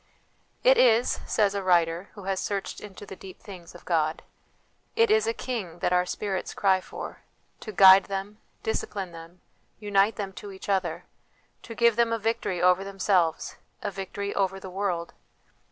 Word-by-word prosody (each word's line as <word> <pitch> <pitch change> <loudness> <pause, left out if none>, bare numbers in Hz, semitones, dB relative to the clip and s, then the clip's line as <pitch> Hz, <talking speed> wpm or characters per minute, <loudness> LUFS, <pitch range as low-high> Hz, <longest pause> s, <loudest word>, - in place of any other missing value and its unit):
" - - -41
It - - +4
is," 235 0 +4
says 205 -2 +2
a 200 - -2
writer 175 0 +2
who 200 - -10
has 190 0 -1
searched 200 -1 -4
into 205 -1 -10
the 190 - -9
deep 185 -1 -12
things 180 -4 -12
of 175 - -14
God 160 -2 0 0.4
" - - -40 0.3
it 460 -2 +4
is 435 +1 +3
a - - +2 0.2
King 200 -10 -3
that 175 - 0
our 180 0 +2
spirits 195 -1 -3
cry 190 -2 +3
for, - - -8 0.4
to 215 - -7
guide 190 -1 +8
them, 195 +2 -5 0.2
discipline 200 -4 -3
them, 165 +2 -12 0.4
unite 205 0 +2
them 195 -2 -5
to 205 - -8
each 190 +1 -10
other; 180 -4 -1 0.6
to 230 - -9
give 235 -1 +3
them 235 -1 +3
a 230 - +1
victory 225 -4 -1
over 180 +1 +4
themselves, 195 -4 0 0.3
a - - -2
victory 200 +1 -5
over 195 -1 0
the 190 -1 -9
world. 180 -3 -2
195 Hz, 180 wpm, -26 LUFS, 180-210 Hz, 0.6 s, guide